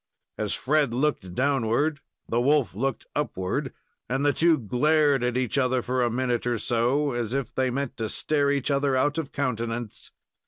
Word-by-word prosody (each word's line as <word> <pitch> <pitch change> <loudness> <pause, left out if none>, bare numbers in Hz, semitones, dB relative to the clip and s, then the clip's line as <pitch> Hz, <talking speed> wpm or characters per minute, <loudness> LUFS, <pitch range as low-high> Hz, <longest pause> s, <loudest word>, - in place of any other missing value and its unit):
As 105 -1 -1
Fred 145 -3 +1
looked 125 -10 -1
downward 140 +3 +1 0.3
the 120 +1 +1
wolf 140 -2 +2
looked 130 +5 -2
upward, 95 -11 -2 0.4
and 135 +3 0
the 145 - +4
two 165 -1 +4
glared 145 +3 +2
at 125 0 0
each 130 +1 0
other 130 -1 +1
for 130 +1 0
a 120 - +2
minute 120 0 -1
or 120 -1 +1
so, 120 +6 +1
as 120 -2 -3
if 135 -3 -2
they 130 -1 +1
meant 140 +1 -3
to 110 -1 -2
stare 145 +3 +1
each 140 0 0
other 140 -1 +1
out 145 +4 +1
of 150 -4 -5
countenance. 115 -4 -3
130 Hz, 180 wpm, -26 LUFS, 120-145 Hz, 0.4 s, the